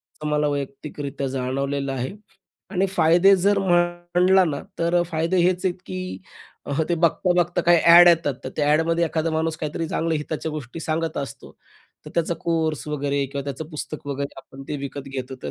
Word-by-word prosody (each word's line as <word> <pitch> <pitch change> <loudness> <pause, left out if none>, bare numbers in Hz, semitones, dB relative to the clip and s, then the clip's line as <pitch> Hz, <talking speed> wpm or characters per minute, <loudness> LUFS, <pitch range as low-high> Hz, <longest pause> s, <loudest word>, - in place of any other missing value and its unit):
असं 150 - -8
मला 150 0 +1
वैयक्तिकरित्या 140 0 -4
जाणवलेलं 135 +2 -2
आहे. 130 +4 -3 0.6
आणि 195 -1 +1
फायदे 185 +1 +5
जर 200 +1 +3
म्हटलं 175 0 +3
ना, 145 -4 -2 0.2
तर 170 +1 0
अ, - - +3
फायदे 165 +3 0
हेच 180 +1 +1
आहेत, 185 -2 +1
की 95 -1 -5 0.7
अह, 145 +3 0
ते 175 - +2
बघता-बघता 175 +1 +2
काही 175 0 +5
ॲड 175 +1 +9
येतात, 165 -5 +3
तर - - -3
त्या 150 - +1
ॲडमध्ये 165 +2 +2
एखादा 165 0 -1
माणूस 160 0 -1
काहीतरी 155 +2 -3
चांगल्या 165 -1 0
हिताच्या 155 +1 -4
गोष्टी 150 0 -7
सांगत 160 0 -2
असतो. 140 -1 -7 0.5
तर - - -8
त्याचा 170 0 +1
कोर्स 160 -3 -1
वगैरे 140 -1 -1
किंवा 140 +1 -5
त्याचं 140 +2 -5
पुस्तक 150 -1 -7
वगैरे 140 0 -4
आपण 135 0 -12
ते 150 - -2
विकत 140 0 -6
घेतो, 130 -1 -5
तर - - -4
160 Hz, 180 wpm, -23 LUFS, 140-170 Hz, 0.7 s, ॲड